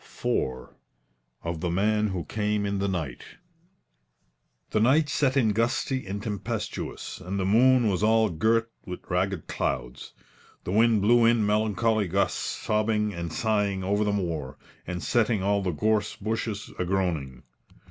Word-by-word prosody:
IV 65 -1 -2 0.7
OF 85 -1 -3
THE 90 - -1
MAN 105 +4 +2
WHO 90 -5 -3
CAME 105 +3 -1
IN 100 0 -1
THE 100 - 0
NIGHT 80 -10 -5 1.3
The 110 - +2
night 145 +7 +4
set 140 -1 +1
in 120 -5 +4
gusty 115 +3 0
and 100 +1 -4
tempestuous, 105 -4 -4
and 95 +2 -3
the 95 - 0
moon 120 +4 +5
was 95 -3 0
all 110 0 +3
girt 115 +7 +1
with 90 -3 -7
ragged 90 -1 0
clouds. - - -3 0.5
The - - -4
wind 110 0 +4
blew 120 +2 +5
in 115 -2 +4
melancholy 105 0 +1
gusts, 95 +3 0
sobbing 105 -1 0
and 85 -2 -5
sighing 100 -1 0
over 100 +3 +1
the 105 - +1
moor, 85 -9 -3 0.3
and 90 0 -4
setting 115 -4 +1
all 100 +1 +2
the 95 - -1
gorse 105 +5 0
bushes 110 0 -3
agroaning. 85 -9 -1
105 Hz, 145 wpm, -26 LUFS, 90-110 Hz, 1.3 s, moon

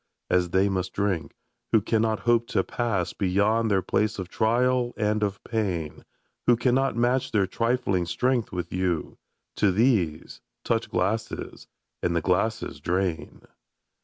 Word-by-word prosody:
As 90 -1 +2
they 95 +3 +3
must 95 -2 -2
drink, 100 -5 -1 0.4
who 110 - +6
cannot 110 +1 0
hope 120 -1 +2
to - - +1
pass 110 -7 -2
Beyond 105 +4 +1
their 95 -3 +2
place 110 +1 0
of 95 -2 -5
trial 120 +3 +1
and 105 -1 0
of 100 -1 -2
pain. 95 -9 -3 0.4
Who 120 - +5
cannot 130 +2 +1
match 120 +2 +1
their 100 -3 +2
trifling 100 -4 0
strength 125 +2 0
with 90 -2 -4
you; 90 -4 -2 0.4
To 105 - +3
these, 95 - +1 0.2
touch - - 0
glasses 100 +5 -2 0.2
— - - -46
^and 85 -1 +1
the 85 - +1
glasses 95 +6 0
drain 90 -2 -2
105 Hz, 145 wpm, -26 LUFS, 90-115 Hz, 0.4 s, who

